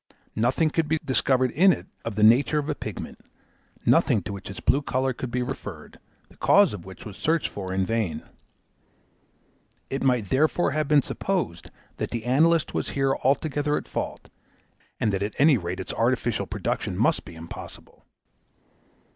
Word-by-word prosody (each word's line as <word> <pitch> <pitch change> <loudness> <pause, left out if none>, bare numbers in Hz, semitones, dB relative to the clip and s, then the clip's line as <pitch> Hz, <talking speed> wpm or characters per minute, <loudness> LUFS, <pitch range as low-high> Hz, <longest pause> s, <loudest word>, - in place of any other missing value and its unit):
Nothing 130 +8 +2
could 165 -1 0
be 160 - +1
discovered 130 -1 +2
in 190 +6 +5
it - - -3 0.2
of 115 - -4
the 105 - +1
nature 125 +7 +5
of 150 -1 -1
a 150 - 0
pigment, 110 -8 -7 0.7
nothing 105 - +3
to 100 - -5
which 100 -1 -8
its 95 - -7
blue 140 - +2
colour 130 -1 0
could 125 +1 -5
be 125 +1 -1
referred, 105 - -7 0.3
the - - -21
cause 200 - +5
of 90 -4 -8
which 95 -2 -11
was 105 -3 -8
searched 160 +6 0
for 95 -2 -6
in 95 0 0
vain. 110 -5 -1 1.7
It 135 - -2
might 125 -7 +1
therefore 155 +5 +2
have 155 0 -1
been 145 -2 +4
supposed 175 - -3 0.3
that - - -3
the 115 -1 -4
analyst 160 +6 +3
was - - -2
here 135 0 +2
altogether 145 +2 +1
at - - -6
fault, - - -5 0.7
and 105 - +1
that 95 - -1
at 100 0 -3
any 145 +1 +6
rate 90 +1 -4
its 95 - -4
artificial 120 -2 0
production - - -3
must - - +2
be - - -11
impossible. 80 +1 -10
130 Hz, 170 wpm, -25 LUFS, 105-150 Hz, 1.7 s, any